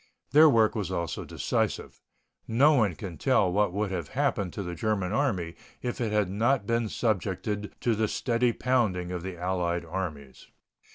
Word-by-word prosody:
Their 155 +3 +8
work 115 -5 +4
was 105 -4 -3
also 85 -2 -3
decisive. - - -2 0.5
No 135 +7 +5
one 110 - +2
can 85 -5 -8
tell 90 - +3
what 105 -1 +2
would 100 +1 -2
have 90 -3 -3
happened 130 -9 -1
to 100 - -4
the 90 -1 -5
German 100 0 -1
Army 95 -12 0 0.3
if 125 0 -3
it 110 -3 -1
had 105 -2 +2
not 110 +4 +1
been 115 0 0
subjected 105 -1 -2
to 120 - +2
the 110 0 +1
steady 120 +2 +1
pounding 110 -9 0
of 90 -1 -3
the 95 0 -6
allied 90 -1 -1
armies. 80 -6 -6
105 Hz, 170 wpm, -28 LUFS, 90-115 Hz, 0.5 s, Their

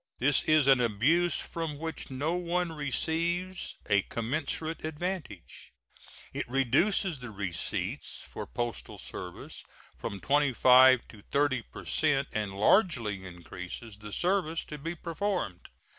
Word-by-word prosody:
This 135 +3 +4
is 155 -2 +5
an 135 -2 +6
abuse 135 +11 +3
from 165 -3 -4
which 160 +1 -5
no 140 +5 -1
one 175 0 0
receives 170 +5 -2
a 100 -1 +4
commensurate 150 +9 -3
advantage; 155 - -5 0.6
it - - -3
reduces 155 - +2
the 125 -2 -7
receipts 95 -5 -3
for - - -7
postal 120 - -4
service - - -8 0.3
from 100 - -5
25 130 -1 +6
to 105 - -14
30 140 -3 +2
per - - -9
cent 140 -3 +1
and 105 -2 -3
largely 115 - +3
increases 90 +4 -8
the 105 0 -9
service 175 - 0
to 150 - -7
be 165 +4 -4
performed. 170 - -3
145 Hz, 125 wpm, -30 LUFS, 115-165 Hz, 0.6 s, an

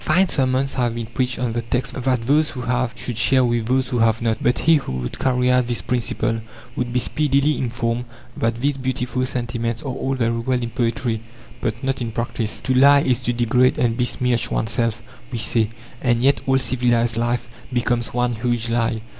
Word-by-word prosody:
Fine 180 +4 +3
sermons 135 0 +1
have 120 -3 0
been 115 -1 -3
preached 125 +2 -2
on 120 -2 -1
the 120 - -1
text 125 +3 -2
that 125 -2 -1
those 150 +4 +3
who 125 - -6
have 125 0 0
should 120 - -4
share 130 +3 +3
with 120 -2 0
those 130 +1 +1
who 120 - -1
have 115 0 +3
not, 115 -1 -1
but 125 - +2
he 165 0 +4
who 135 - -5
would 65 -1 -4
carry 125 -1 +2
out 125 -1 +3
this 120 -1 -2
principle 115 -1 -1 0.4
would 120 -1 -2
be 125 - 0
speedily 145 +2 +1
informed 120 -1 -2 0.3
that 115 0 0
these 140 +2 0
beautiful 130 0 -2
sentiments 115 -2 -3
are 135 -3 -3
all 135 +1 -2
very 115 -2 0
well 125 +1 -1
in 115 - -4
poetry, 115 -2 -1 0.4
but 110 +2 -3
not 135 0 -1
in 115 -1 -2
practice. 115 -1 -3
"To 130 - 0
lie 140 +2 +6
is 125 -4 +1
to 120 -1 -1
degrade 120 +2 +2
and 115 -2 +1
besmirch 125 0 0
oneself," 115 0 -1 0.3
we 120 - -3
say, 110 -1 +1 0.3
and 120 -1 +1
yet 140 +1 +3
all 135 0 +4
civilized 120 -2 +1
life 120 +1 0 0.2
becomes 120 -1 0
one 125 0 0
huge 120 -1 -1
lie. 115 -1 0
120 Hz, 200 wpm, -21 LUFS, 115-130 Hz, 0.4 s, lie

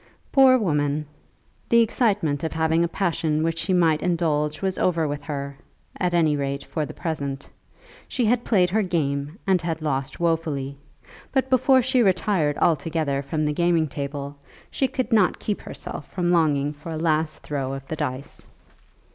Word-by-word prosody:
Poor 265 -1 +7
woman! 150 - 0 0.6
The 235 0 +6
excitement 205 - +1
of 160 - -2
having 160 +1 +2
a - - +2
passion 165 -4 0
which 165 0 -1
she 190 - -1
might 165 -4 +3
indulge 155 -4 0
was 190 -1 -2
over 165 -3 +1
with 145 0 -4
her, 140 -2 -5 0.4
at 180 -1 0
any 160 -3 +3
rate 140 0 -2
for 155 -3 -3
the - - -8
present. 140 -4 -4 0.6
She 250 - 0
had 240 +2 +2
played 180 -5 +2
her 220 +3 +2
game 150 -4 -1
and 190 -3 +3
had 165 -2 -2
lost 135 -3 -3
wofully; 160 -5 -1 0.6
but 265 -1 0
before 260 0 +5
she 255 0 +2
retired 180 -6 +2
altogether 155 -3 +1
from 155 +3 -2
the 150 - 0
gaming 170 0 +2
table 140 0 -5 0.3
she 270 - +1
could 255 -2 -2
not 210 -5 +4
keep 210 - -3
herself 145 - -7
from 175 -2 -1
longing 150 -4 +2
for 150 +3 -9
a 160 - -3
last 155 -1 0
throw 135 -3 -3
of 135 0 -9
the 160 - -3
dice. 130 -1 -5
160 Hz, 170 wpm, -24 LUFS, 145-180 Hz, 0.6 s, Poor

